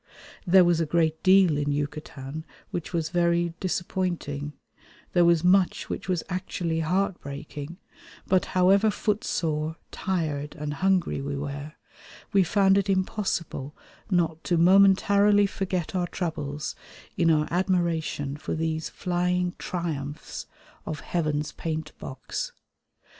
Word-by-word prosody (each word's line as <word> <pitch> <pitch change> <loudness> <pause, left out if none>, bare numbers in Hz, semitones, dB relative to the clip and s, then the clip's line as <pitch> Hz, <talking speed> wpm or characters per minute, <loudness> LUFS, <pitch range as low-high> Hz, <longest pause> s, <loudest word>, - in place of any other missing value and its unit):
There 185 +1 +7
was 170 -1 +3
a 165 - 0
great 160 0 +1
deal 185 -5 +5
in 145 0 0
Yucatan 145 0 -4 0.3
which 175 - -4
was 165 -3 -1
very 170 -1 +1
disappointing; 175 -6 -2 0.6
there 175 - +5
was 170 -1 +4
much 185 0 +3
which - - -5
was 180 -3 0
actually 180 -3 -2
heartbreaking; 160 -3 -3 0.5
but 185 -1 +2
however 195 +4 +5
footsore, 165 -8 -1 0.2
tired, 155 -6 -2
and 150 0 -4
hungry 185 -1 +1
we 140 +1 -3
were, 145 +1 -5 0.6
we 195 -1 +6
found 195 +2 +4
it 200 0 -2
impossible 185 -7 -1 0.3
not 165 -4 +1
to 175 - +2
momentarily 200 +3 +5
forget 185 -3 -2
our 180 -1 0
troubles 150 -4 -3 0.4
in 170 -1 +3
our 155 -1 +3
admiration 170 -6 0
for 155 - -4
these 160 0 -2
flying 180 0 0
triumphs 155 -5 -4 0.4
of 155 - -5
Heaven's 155 -3 -1
paint 160 -1 -4
box. 130 0 -5
170 Hz, 120 wpm, -26 LUFS, 150-185 Hz, 0.6 s, There